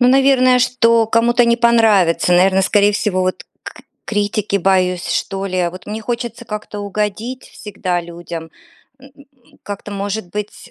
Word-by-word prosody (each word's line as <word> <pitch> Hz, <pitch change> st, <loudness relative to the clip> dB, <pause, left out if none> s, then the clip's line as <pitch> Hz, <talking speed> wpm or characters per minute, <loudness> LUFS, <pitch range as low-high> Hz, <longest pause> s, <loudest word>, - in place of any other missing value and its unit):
Ну, 245 Hz, -, +5 dB
наверное, 260 Hz, -1 st, +4 dB
что 230 Hz, -2 st, +3 dB
кому-то 235 Hz, +2 st, +3 dB
не 235 Hz, 0 st, +3 dB
понравится, 220 Hz, -8 st, +3 dB
наверное, 190 Hz, +2 st, +4 dB
скорее 205 Hz, +1 st, +3 dB
всего 195 Hz, -2 st, -1 dB
вот 185 Hz, 0 st, -2 dB, 0.2 s
к -, -, -10 dB, 0.2 s
критики 205 Hz, -1 st, -1 dB
боюсь, 185 Hz, -1 st, +1 dB
что 195 Hz, 0 st, -2 dB
ли. 180 Hz, -2 st, -1 dB
Вот 185 Hz, +1 st, -11 dB
мне 215 Hz, +1 st, -5 dB
хочется 235 Hz, 0 st, -4 dB
как-то 210 Hz, -1 st, -6 dB
угодить 210 Hz, +5 st, -4 dB
всегда 185 Hz, -4 st, -4 dB
людям, 170 Hz, -1 st, -8 dB, 0.5 s
м, 270 Hz, 0 st, -16 dB, 0.5 s
как-то, 205 Hz, 0 st, -7 dB
может 200 Hz, -1 st, -4 dB
быть, 210 Hz, 0 st, -7 dB
205 Hz, 145 wpm, -17 LUFS, 185-235 Hz, 0.5 s, Ну